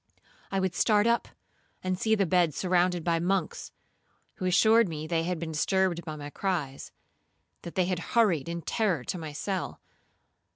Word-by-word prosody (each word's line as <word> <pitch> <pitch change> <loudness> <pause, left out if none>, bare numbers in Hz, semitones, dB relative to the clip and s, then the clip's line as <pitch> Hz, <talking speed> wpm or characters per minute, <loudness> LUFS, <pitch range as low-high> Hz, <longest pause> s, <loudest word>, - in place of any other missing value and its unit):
I 195 - +1
would 190 -2 0
start 210 +1 +3
up 235 0 +2 0.6
and 185 0 0
see 220 +4 +2
the 200 -2 +2
bed 175 -3 +2
surrounded 180 -2 +1
by 170 -1 +1
monks, 180 0 -1 0.7
who 185 - -4
assured 220 +3 +5
me 155 -1 -5
they 165 0 0
had 180 0 -1
been 160 0 -5
disturbed 175 +2 +1
by 155 -1 -6
my 145 -1 -8
cries,—that 170 0 -6
they 185 - +2
had 180 -1 -1 0.2
hurried 175 -10 +3
in 170 0 -4
terror 190 - 0
to 180 - -4
my 155 -2 -6
cell. 190 +6 -4
180 Hz, 165 wpm, -28 LUFS, 165-190 Hz, 0.7 s, assured